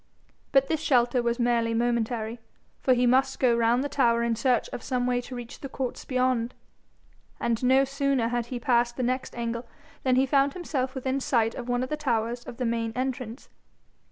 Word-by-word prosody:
But 270 0 +4
this 315 +1 0
shelter 250 -5 +2
was 235 0 0
merely 235 -2 +1
momentary, 235 -1 -1 0.4
for 255 - +4
he 245 +1 +2
must 265 +2 +3
go 245 -3 +4
round 235 +2 +2
the - - -1
tower 235 -5 +2
in 235 -1 +1
search 245 +1 +1
of - - -6
some 250 0 -1
way 245 0 +1
to 250 +1 -8
reach 240 -1 -8
the 275 - -7
courts 260 -1 -4
beyond; 255 -2 0 0.8
and 235 0 -1
no 260 +2 +5
sooner 275 -3 0
had 240 -1 -1
he 245 0 -4
passed 240 0 +1
the 255 - -1
next 255 +2 -2
angle 235 0 -3 0.3
than 255 -1 +2
he 260 +1 +4
found 275 +1 +2
himself 275 -7 -3
within 265 +1 -1
sight 230 -4 +1
of 245 -1 -7
one 245 +1 +1
of 255 - -4
the 305 - -2
towers 240 -4 -1
of 235 - -9
the 250 - -1
main 230 -1 -1
entrance. 255 -1 -4
245 Hz, 200 wpm, -27 LUFS, 235-265 Hz, 0.8 s, no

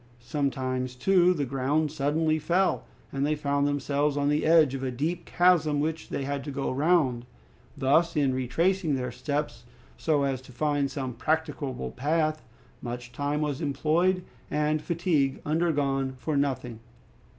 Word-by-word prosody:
Sometimes, 130 -1 -2
too, 180 +5 +4
the 150 -6 0
ground 140 +4 0
suddenly 155 +2 +1
fell, 175 +5 +1 0.3
and 135 0 -2
they 150 +1 +1
found 145 -1 0
themselves 145 0 0
on 145 0 +1
the 150 +1 +1
edge 160 -4 +5
of 135 - -4
a 135 - -1
deep 160 +7 -2
chasm 165 -5 +3
which 160 +2 -2
they 140 - -3
had 140 0 -3
to 145 - -6
go 140 -1 -2
round. 140 -4 +2 0.5
Thus, 160 +5 +3
in 140 -3 +2
retracing 160 +6 +1
their 125 -1 -3
steps 140 -3 -3 0.4
so 150 -3 +2
as 135 -2 -1
to 130 0 -15
find 145 +1 0
some 130 -2 -4
practicable 150 -1 -2
path, 155 +3 0 0.4
much 120 0 -6
time 145 +4 -2
was 150 0 -2
employed 165 +5 +1 0.3
and 150 +1 0
fatigue 160 -5 0
undergone 145 -4 0
for 150 +4 -2
nothing. 130 -5 -1
145 Hz, 150 wpm, -27 LUFS, 135-155 Hz, 0.5 s, edge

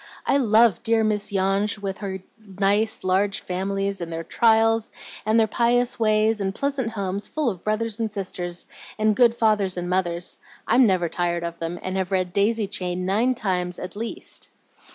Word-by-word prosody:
"I 275 - +3
love 230 -4 +4
dear 225 -1 +2
Miss 210 -1 0
Yonge, 195 +2 +1
with 195 -2 -5
her 190 -2 -5 0.2
nice, 205 +1 0
large 195 +2 +1
families, 195 +1 -2
and 170 -1 -5
their 165 0 -4
trials, 225 +2 +3 0.4
and 220 +1 +4
their 225 - +5
pious 240 +3 +1
ways, 215 -1 +2
and 195 0 -2
pleasant 275 -5 -2
homes 200 -1 -3
full 300 -6 -1
of 180 -3 -10
brothers 215 +1 -1
and 225 -1 0
sisters, 180 -4 -3 0.3
and 215 -1 +2
good 235 -1 +4
fathers 210 -5 +1
and 175 0 -3
mothers. 175 -1 0 0.3
I'm 245 +1 +5
never 185 -3 +2
tired 175 0 -1
of 170 0 -5
them, 165 +1 -4
and 185 +1 -3
have 190 -1 -1
read 185 -2 0
'Daisy 210 +2 +2
Chain' 180 -2 -3
nine 225 +7 +2
times 180 -6 -1
at 180 +1 -7
least." 225 +2 -6
200 Hz, 175 wpm, -24 LUFS, 185-225 Hz, 0.4 s, their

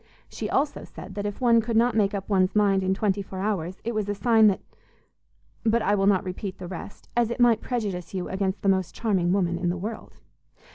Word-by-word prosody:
She - - -5
also 285 +2 0
said - - -10
that 205 0 -3
if 205 - -6
one 235 -2 +4
could 225 0 -1
not 240 +1 +4
make 205 -2 +2
up 195 -1 -4
one's 190 -1 +2
mind 200 -2 +3
in 190 0 +1
twenty 200 -1 0
four 190 -1 -8
hours 190 -3 -2
it 235 - -2
was 215 -2 -2
a 205 - -1
sign 225 0 +5
that 195 - +2 1.0
but 230 0 +2
I 205 - +2
will 195 -1 +2
not 195 -2 +3
repeat 185 +1 -5
the 185 - -8
rest, 185 +2 -9
as 235 -1 +2
it 235 - -4
might 235 -2 +4
prejudice 200 -8 -3
you 185 -2 -3
against 190 0 -2
the - - 0
most 190 -2 0
charming 190 -6 +1
woman 175 -3 +1
in 175 0 0
the 175 - -1
world. 215 +5 -7
200 Hz, 230 wpm, -25 LUFS, 190-220 Hz, 1.0 s, sign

